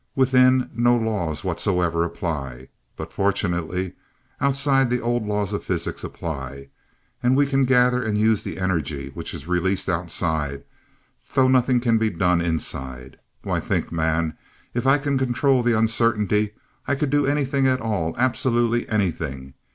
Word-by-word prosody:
Within, 130 -1 +4
no 120 +1 +3
law 105 -8 -1
whatsoever 85 -1 0
applies, 70 -7 -4 0.3
but - - -7
fortunately, 90 -2 -1 0.5
outside 135 -1 +2
the 125 +1 +1
old 120 -2 -1
laws 105 -1 -1
of 105 - -3
physics - - -3
apply 70 -3 -6 0.5
and 125 +2 +3
we 145 - +4
can 135 -1 +2
gather 125 -1 +3
and 110 -3 -1
use 110 0 +3
the - - -6
energy 80 -7 -2
which - - -5
is 70 - -8
released 90 +2 0
outside, 80 -5 -1 0.7
though 130 -1 +5
nothing 130 -1 +3
can 115 -2 +2
be 110 0 +2
done 90 -1 +1
inside. 65 -6 -3 0.2
Why, - - -1
think, - - -2
man, 80 -1 0 0.4
if 120 +2 -1
I 135 +2 +6
could 140 -1 -1
control 130 +1 +2
that 120 -2 +2
Uncertainty, 110 -2 +1 0.3
I 140 - +1
could 140 -1 -1
do 145 -1 +2
anything 140 -1 +1
at 130 0 +2
all, 100 -8 -2
absolutely 120 -2 +1
anything. 80 -10 -2
105 Hz, 150 wpm, -23 LUFS, 85-125 Hz, 0.7 s, I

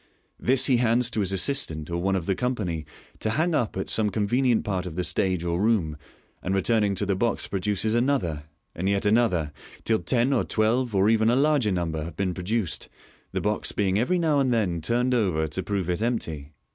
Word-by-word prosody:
This 130 +1 +3
he 130 -3 +4
hands 120 0 +2
to 110 - -2
his 95 -2 0
assistant 90 - 0
or 85 - -1
one 95 +1 +1
of 90 -3 -2
the 95 - +1
company 95 -10 -2 0.3
to 110 - -1
hang 160 +9 +1
up 120 -10 0
at 95 - -3
some 110 -2 +1
convenient 115 +4 +1
part 95 -3 -2
of 80 - -7
the 90 - -1
stage 90 -1 0
or 85 +1 -1
room, 100 -9 +1 0.5
and 95 +2 -1
returning 105 0 +2
to 100 - -1
the 100 -1 0
box 115 +3 0
produces 100 +2 -1
another, 115 - 0 0.3
and 95 +3 -2
yet 100 +1 0
another, 105 -9 +2 0.3
till 110 -1 +2
ten 125 +2 +1
or 125 - +2
twelve, 115 +1 0
or 95 +1 +4
even 110 0 +3
a 120 - +3
larger 140 -5 +2
number, 80 -4 -2
have 80 0 -7
been 95 -2 -1
produced, 95 +1 -2 0.4
the - - -2
box 105 0 -1
being 100 -1 +1
every 130 +10 +1
now 160 -4 +2
and 130 -2 +2
then 95 -8 0
turned 120 +8 +1
over 90 -10 +1
to 80 +5 -3
prove 100 -3 -2
it 90 +3 -1
empty. 80 -12 -2
105 Hz, 210 wpm, -25 LUFS, 90-120 Hz, 0.5 s, he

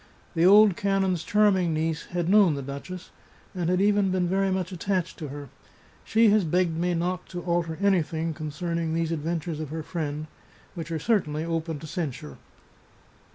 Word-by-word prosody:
The 170 0 +4
old 205 -1 +7
canon's 195 -3 0
charming 195 -6 +3
niece 160 0 -2
had 175 -2 -2
known 195 -5 +5
the 140 - -5
duchess, 155 +7 -8 0.4
and 175 -3 -2
had 180 0 +2
even 200 0 +3
been 185 -1 +1
very 195 +2 +1
much 185 -1 -2
attached 185 0 -2
to 155 - -5
her. 145 -1 -8 0.5
She 220 -1 +4
has 210 -1 +4
begged 175 0 +1
me 175 +1 0
not 180 +2 -2
to 175 -1 -6
alter 170 -2 -1
any 195 -3 +3
thing 160 +1 -3
concerning 160 +2 -3
these 165 0 -1
adventures 165 0 -3
of 155 -3 -5
her 160 +1 -5
friend, 150 -2 -4 0.5
which 170 -2 -6
are 165 - -1
certainly 155 -5 0
open 165 -1 -2
to 160 - -9
censure. 145 - -5
170 Hz, 175 wpm, -26 LUFS, 160-185 Hz, 0.5 s, old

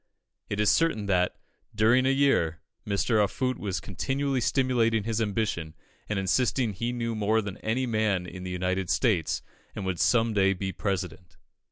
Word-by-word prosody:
It 105 - -3
is 105 - +4
certain 165 -11 +1
that, 90 -2 +1 0.4
during 115 +4 +4
a - - +4
year, 135 - +2 0.3
Mr. 105 +2 +2
Offutt 130 +5 -1
was 95 -3 -2
continually 135 +8 -2
stimulating 115 -4 +2
his 115 +1 -1
ambition, 100 -7 -2 0.3
and 105 - -1
insisting 120 +5 +1
that 95 - -12
he 120 +1 -1
knew 115 -1 -2
more 110 +1 +1
than 100 -3 -5
any 120 +4 -1
man 110 -6 0
in 90 +1 -8
the 90 - -5
United 90 0 -2
States, 100 - +1 0.3
and - - -4
would 95 -2 -2
some 115 -2 +3
day 95 -1 +3
be 95 0 -4
President. 90 -2 -4
105 Hz, 170 wpm, -27 LUFS, 95-120 Hz, 0.4 s, is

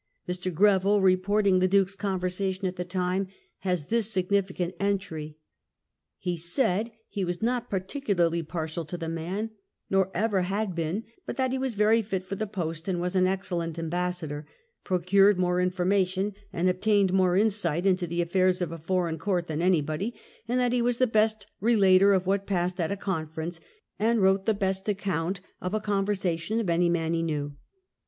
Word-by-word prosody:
Mr. 180 +1 -2
Greville, 200 +3 +4
reporting 190 +1 +3
the 185 - +3
Duke's 195 +1 +2
conversation 190 0 -2
at 185 0 -1
the 180 - -3
time, 180 +1 -1 0.3
has 180 -5 -1
this 225 -2 +2
significant 185 -2 0
entry: 160 -7 -2 0.4
" 75 +4 -58
He 175 - +1
said 185 - 0 0.2
he 200 - -3
was 175 +3 -3
not 245 0 0
particularly 185 - 0
partial 160 0 -4
to 175 +4 -5
the 165 -1 -5
man, 180 +7 -3 0.4
nor 190 -1 +3
ever 205 0 +1
had 195 +2 -1
been; 170 +6 -2 0.2
but - - -4
that 260 -1 +1
he 265 - -1
was 260 -4 -2
very 215 +2 +4
fit 195 -3 -3
for 185 - -6
the 215 +2 -2
post, 165 -4 -4
waa 180 -1 0
an 185 -1 +3
excellent 175 -4 -2
ambassador, 165 -3 -3 0.4
procured 195 +2 +4
more 180 0 +1
information 185 +2 +1 0.2
and 175 +2 0
obtained 195 +1 +2
more 185 -1 +3
insight 195 -5 +1
into 185 -2 +2
the 170 +1 0
affairs 185 +1 +2
of 175 -3 -2
a 165 - -6
foreign 170 -1 -1
court 180 -1 0
than 160 -1 -3
anybody, 175 +4 +1 0.3
and 245 +2 +1
that 245 -1 +2
he 245 - +2
was 240 0 +1
the 255 - +4
best 215 -2 +1
relator 200 -3 +5
of 190 -2 +2
what 195 +1 0
passed 180 -1 -1
at 165 0 0
a 200 - -2
conference, 165 -3 -4 0.4
and 225 +2 +2
wrote 190 0 +3
the 220 - +3
best 190 0 -1
account 190 -2 -1 0.2
of 180 +3 -2
a - - +1
conversation 200 -1 -1
of 200 -7 0
any 170 +1 +3
man 165 -1 0
he 165 - +1
knew.'' 145 -3 -2
185 Hz, 175 wpm, -27 LUFS, 175-200 Hz, 0.4 s, relator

